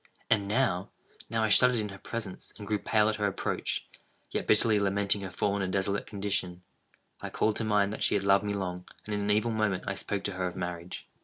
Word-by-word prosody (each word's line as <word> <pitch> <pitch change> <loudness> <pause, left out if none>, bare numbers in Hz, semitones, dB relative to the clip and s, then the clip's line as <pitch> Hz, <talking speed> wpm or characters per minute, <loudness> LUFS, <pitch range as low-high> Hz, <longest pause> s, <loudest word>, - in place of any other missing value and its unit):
And 100 -2 +3
now—now 110 0 -2
I 110 - +2
shuddered 125 +5 +6
in 105 -2 -1
her 100 0 -9
presence, 110 -5 -6
and 105 - -8
grew 105 0 0
pale 105 0 +3
at 110 -1 0
her 105 -1 +1
approach; 100 - -2 0.4
yet, - - -2
bitterly 110 0 +4
lamenting 100 0 +1
her 95 - -4
fallen 100 +2 0
and 95 -1 -1
desolate 100 +1 0
condition, 95 -3 -2 0.6
I - - -4
called 110 -1 +1
to - - -1
mind 105 -1 +2
that - - -6
she - - +3
had 100 - +1
loved 100 0 +4
me 105 0 -1
long, 90 -2 -4 0.2
and, 105 - -4
in 105 - -1
an 100 - -1
evil 110 +3 +2
moment, 110 -4 0
I 95 - -1
spoke 100 0 -3
to 100 - -1
her 90 -1 -2
of 90 - -6
marriage. 90 -1 -5
100 Hz, 225 wpm, -29 LUFS, 95-105 Hz, 0.6 s, shuddered